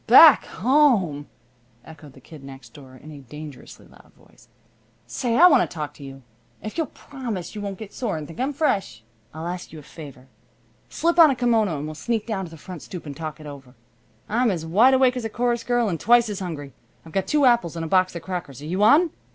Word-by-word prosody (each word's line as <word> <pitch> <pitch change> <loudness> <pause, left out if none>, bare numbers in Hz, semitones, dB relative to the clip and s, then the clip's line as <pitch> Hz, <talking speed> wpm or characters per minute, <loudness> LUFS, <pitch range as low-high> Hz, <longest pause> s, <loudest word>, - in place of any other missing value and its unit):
"Back 265 +3 +8
home!" 215 - +1 0.6
echoed 150 -3 -14
the 135 - -16
Kid 150 +1 -14
Next 135 -3 -12
Door 130 -3 -14
in 155 - -11
a 145 - -11
dangerously 145 +1 -11
loud - - -20
voice. - - -23 0.6
"Say, 235 -2 -2
I 350 - +8
want 285 -8 +6
to - - -21
talk 150 -3 -6
to 145 - -14
you. 135 -1 -11 0.4
If 215 - -8
you'll 325 -3 -1
promise 235 -11 -7
you 210 - -6
won't 200 -2 -5
get 215 0 -10
sore 230 -9 -3
and 155 - -6
think 165 +9 -12
I'm 265 +3 0
fresh, 200 - -1 0.3
I'll 160 +2 -8
ask 180 +1 -6
you 160 - -10
a 150 - -11
favor. 140 -4 -12 0.6
Slip 340 +1 0
on 325 -2 +9
a 270 - 0
kimono 225 -9 +1
and 145 - -5
we'll 155 - -6
sneak 220 +7 -3
down 200 -5 -3
to - - -10
the 165 - -12
front 175 +1 -10
stoop 180 -3 -9
and 145 -2 -7
talk 155 0 -7
it 155 - -12
over. 135 -3 -11 0.5
I'm 235 +3 +1
as 170 -5 -3
wide 225 +11 +4
awake 260 -1 +3
as 245 - -4
a 225 - -3
chorus 240 0 -1
girl 240 -1 +1
and 170 -5 -2
twice 235 0 +4
as 205 - -4
hungry. 150 -7 -6 0.3
I've 165 - -12
got 195 +2 -2
two 300 -2 +2
apples 235 -10 +2
and 165 -1 -4
a - - -5
box 185 +1 +2
of 170 - -7
crackers. 175 -8 -6
Are - - -7
you 180 +5 -2
on?" 295 +10 +5
185 Hz, 235 wpm, -23 LUFS, 150-240 Hz, 0.6 s, on